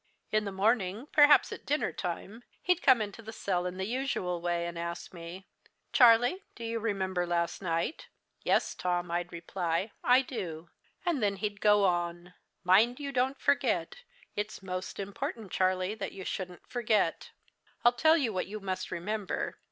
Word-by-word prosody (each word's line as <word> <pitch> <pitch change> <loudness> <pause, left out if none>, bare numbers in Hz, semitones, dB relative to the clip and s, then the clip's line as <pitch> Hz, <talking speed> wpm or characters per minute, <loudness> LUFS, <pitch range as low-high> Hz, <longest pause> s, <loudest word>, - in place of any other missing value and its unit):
"In 215 0 +2
the 200 - -3
morning, 205 +2 +1
perhaps 290 -1 +6
at - - -7
dinner 295 +1 0
time, 195 +5 -5 0.2
he'd 360 -1 +2
come 250 -5 +5
into 205 +2 -8
the 220 0 -8
cell 180 -4 -1
in 180 +1 -5
the 190 - -2
usual 215 -8 -2
way, 175 0 0
and 170 0 -5
ask 170 +1 -5
me: 175 +2 -9 0.5
"'Charlie, 245 +8 +6
do 235 - -8
you 230 0 -2
remember 190 -5 -1
last 170 +1 -1
night?' 170 - -2 0.3
'Yes, - - +2
Tom,' 175 -1 -1
I'd 175 +1 -2
reply, 170 +3 -2
'I 255 +2 +5
do.' 175 - -6 0.4
And 335 -7 +1
then 200 -1 +2
he'd 205 0 -4
go 210 -1 +5
on: 175 0 -1 0.3
"'Mind 220 +8 +4
you 280 -1 -4
don't 265 +1 0
forget. 485 - +1 0.4
It's 210 -1 -4
most 185 +1 -5
important, 200 +1 -5
Charlie, 185 +1 +1
that 220 - -5
you 190 -1 -8
shouldn't 180 -2 -5
forget. 230 -4 0 0.6
I'll 240 - +7
tell 315 +7 +5
you 250 -8 0
what 185 - -2
you 215 +2 -6
must 185 -1 -3
remember. 200 +4 -3
195 Hz, 165 wpm, -30 LUFS, 180-230 Hz, 0.6 s, I'll